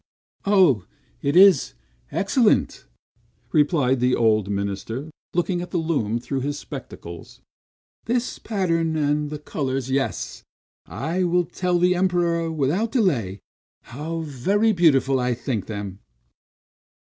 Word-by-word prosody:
"Oh, 180 Hz, -, +4 dB, 0.4 s
it 140 Hz, +2 st, 0 dB
is 180 Hz, -, +6 dB, 0.4 s
excellent!" 210 Hz, -, +1 dB, 0.6 s
replied 145 Hz, -4 st, +2 dB
the 125 Hz, +1 st, +2 dB
old 110 Hz, -3 st, +2 dB
minister, 100 Hz, +8 st, -3 dB, 0.2 s
looking 175 Hz, 0 st, 0 dB
at 180 Hz, -, -6 dB
the 180 Hz, -, -2 dB
loom 145 Hz, -10 st, 0 dB
through 135 Hz, +3 st, -3 dB
his 145 Hz, +2 st, -2 dB
spectacles. 105 Hz, -, -9 dB, 0.7 s
"This 245 Hz, +2 st, -1 dB
pattern, 165 Hz, -6 st, 0 dB
and 150 Hz, -1 st, 0 dB
the 150 Hz, -, -5 dB
colors, 135 Hz, -3 st, -3 dB
yes, 135 Hz, 0 st, -2 dB, 0.5 s
I 155 Hz, -, -2 dB
will 175 Hz, 0 st, +2 dB
tell 180 Hz, +1 st, -1 dB
the 180 Hz, +1 st, +3 dB
Emperor 175 Hz, -2 st, +1 dB
without 160 Hz, +9 st, 0 dB
delay, 125 Hz, -, 0 dB, 0.4 s
how 155 Hz, +7 st, -5 dB
very 190 Hz, -, +1 dB
beautiful 140 Hz, -8 st, +3 dB
I 125 Hz, -1 st, 0 dB
think 120 Hz, -4 st, -3 dB
them." 100 Hz, -3 st, -6 dB
150 Hz, 120 wpm, -23 LUFS, 125-180 Hz, 0.7 s, is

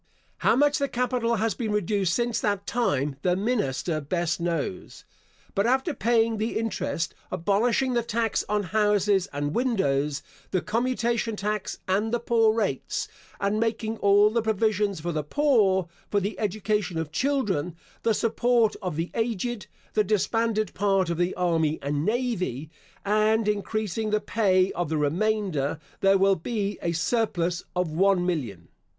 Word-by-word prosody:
How -, -, +3 dB
much 290 Hz, +3 st, +3 dB
the 280 Hz, -, +1 dB
capital 245 Hz, -2 st, 0 dB
has 225 Hz, 0 st, 0 dB
been 225 Hz, -4 st, -3 dB
reduced 200 Hz, -3 st, +1 dB
since 240 Hz, -1 st, 0 dB
that 200 Hz, -2 st, -1 dB
time 145 Hz, -, 0 dB
the 180 Hz, +2 st, +2 dB
minister 185 Hz, -, -1 dB
best 170 Hz, +1 st, -1 dB
knows. 170 Hz, -, -3 dB, 0.5 s
But 200 Hz, +3 st, +1 dB
after 265 Hz, +5 st, +1 dB
paying 225 Hz, -1 st, +2 dB
the 220 Hz, +2 st, -1 dB
interest, 185 Hz, -6 st, -2 dB, 0.2 s
abolishing 230 Hz, +8 st, +1 dB
the 240 Hz, -, +2 dB
tax 230 Hz, -1 st, -1 dB
on 210 Hz, 0 st, +1 dB
houses 205 Hz, 0 st, +2 dB
and 145 Hz, +1 st, -2 dB
windows, 150 Hz, -, 0 dB, 0.3 s
the 185 Hz, -, -1 dB
commutation 235 Hz, 0 st, 0 dB
tax, 210 Hz, 0 st, -3 dB
and 205 Hz, +4 st, +1 dB
the 240 Hz, -, +1 dB
poor 225 Hz, -2 st, +3 dB
rates; 210 Hz, -, -2 dB, 0.3 s
and 200 Hz, +2 st, 0 dB
making 225 Hz, 0 st, -1 dB
all 205 Hz, +1 st, +5 dB
the 230 Hz, +1 st, +1 dB
provisions 210 Hz, -3 st, 0 dB
for 175 Hz, +2 st, -3 dB
the 155 Hz, -2 st, -1 dB
poor, 200 Hz, -, +2 dB, 0.2 s
for 205 Hz, -, +2 dB
the 200 Hz, +2 st, -4 dB
education 210 Hz, -3 st, -1 dB
of 160 Hz, -2 st, -3 dB
children, 205 Hz, -, 0 dB, 0.3 s
the 225 Hz, -2 st, +2 dB
support 235 Hz, 0 st, +2 dB
of 180 Hz, -5 st, -3 dB
the 165 Hz, +3 st, -3 dB
aged, 230 Hz, 0 st, -2 dB, 0.3 s
the 215 Hz, -, +3 dB
disbanded 215 Hz, +2 st, 0 dB
part 195 Hz, -3 st, +1 dB
of 170 Hz, -, -3 dB
the 175 Hz, +1 st, 0 dB
army 165 Hz, -3 st, +1 dB
and 145 Hz, +1 st, -1 dB
navy, 185 Hz, -, -1 dB, 0.3 s
and 215 Hz, +1 st, +2 dB
increasing 215 Hz, 0 st, -1 dB
the 215 Hz, 0 st, +2 dB
pay 190 Hz, -4 st, +2 dB
of 175 Hz, -3 st, -3 dB
the 160 Hz, -, 0 dB
remainder, 165 Hz, -1 st, 0 dB, 0.2 s
there 195 Hz, 0 st, +4 dB
will 195 Hz, 0 st, +4 dB
be 205 Hz, +2 st, -3 dB
a 170 Hz, -, 0 dB
surplus 175 Hz, -1 st, 0 dB
of 180 Hz, -3 st, 0 dB
one 185 Hz, +2 st, +3 dB
million. 120 Hz, -, -3 dB
205 Hz, 155 wpm, -26 LUFS, 175-225 Hz, 0.5 s, all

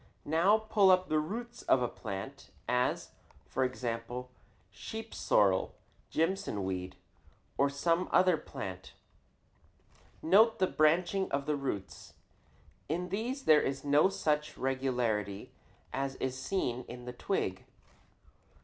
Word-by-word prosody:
Now 170 Hz, +8 st, +4 dB
pull 215 Hz, -3 st, +3 dB
up 185 Hz, 0 st, +4 dB
the 155 Hz, -, +3 dB
roots 235 Hz, +9 st, -5 dB
of 125 Hz, -, +3 dB
a -, -, +1 dB
plant, 100 Hz, -4 st, -7 dB, 0.2 s
as, 125 Hz, +1 st, 0 dB, 0.3 s
for 130 Hz, -, -1 dB
example, 125 Hz, 0 st, -3 dB, 0.4 s
sheep 220 Hz, -, -7 dB
sorrel, 95 Hz, -2 st, +2 dB, 0.3 s
Jimson 165 Hz, -, -1 dB
weed, 95 Hz, -1 st, -4 dB, 0.6 s
or 140 Hz, -, +3 dB
some 165 Hz, +6 st, 0 dB
other 185 Hz, -1 st, +5 dB
plant. 95 Hz, -12 st, -7 dB, 1.3 s
Note 220 Hz, +7 st, +5 dB
the 185 Hz, -, +3 dB
branching 175 Hz, +4 st, +2 dB
of 140 Hz, 0 st, -1 dB
the 150 Hz, 0 st, 0 dB
roots. 135 Hz, -9 st, -5 dB, 0.7 s
In 180 Hz, +3 st, -2 dB
these 240 Hz, +8 st, -3 dB
there 155 Hz, -, +6 dB
is 135 Hz, +1 st, -3 dB
no 145 Hz, +6 st, +5 dB
such 150 Hz, -5 st, -1 dB
regularity 125 Hz, -7 st, -1 dB, 0.4 s
as 135 Hz, 0 st, -2 dB
is 130 Hz, -1 st, -3 dB
seen 130 Hz, -3 st, -2 dB
in 125 Hz, 0 st, -9 dB
the 125 Hz, -, -6 dB
twig. 120 Hz, -, -2 dB
140 Hz, 120 wpm, -32 LUFS, 125-185 Hz, 1.3 s, there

